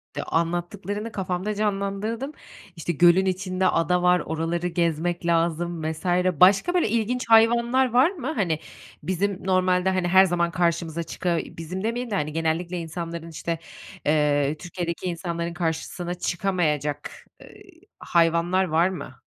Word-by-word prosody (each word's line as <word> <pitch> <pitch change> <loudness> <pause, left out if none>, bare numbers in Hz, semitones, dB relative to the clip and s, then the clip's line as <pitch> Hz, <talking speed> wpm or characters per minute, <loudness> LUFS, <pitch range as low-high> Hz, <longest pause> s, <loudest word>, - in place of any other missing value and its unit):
De - - -3
anlattıklarını 180 +6 -2
kafamda 190 +2 -3
canlandırdım. 210 +5 -2 0.4
İşte, 170 +1 -3
gölün 175 +4 +5
içinde 185 0 0
ada 180 +2 +2
var, 180 0 +4
oraları 165 +2 -2
gezmek 170 0 -1
lazım 170 0 0
vs. 160 +3 -10 0.3
Başka, 195 - +5
böyle, 350 -11 +2
ilginç 235 +3 0
hayvanlar 235 +3 +4
var 265 +9 +5
mı? 315 -4 -4
Hani, 170 -8 0 0.4
bizim 190 +1 -2
normalde, 185 0 +2
hani, 185 -2 0
her 190 +2 +6
zaman 170 -1 0
karşımıza 170 -1 0
çıka 170 +1 -1
bizim 180 +4 -7
demeyelim 235 +1 -2
de, - - 0
hani, 150 -4 -2
genellikle 165 +2 -1
insanların, 165 0 -6
işte, 165 0 -4 0.5
eee, 150 -1 +2
Türkiye'deki 175 0 -5
insanların 170 0 -3
karşısına 175 +1 -3
çıkamayacak, 170 -6 -1 0.3
eee, 410 0 -15 0.4
hayvanlar 170 +2 +2
var 170 0 +2
mı? 180 -8 -7
175 Hz, 135 wpm, -24 LUFS, 165-195 Hz, 0.5 s, her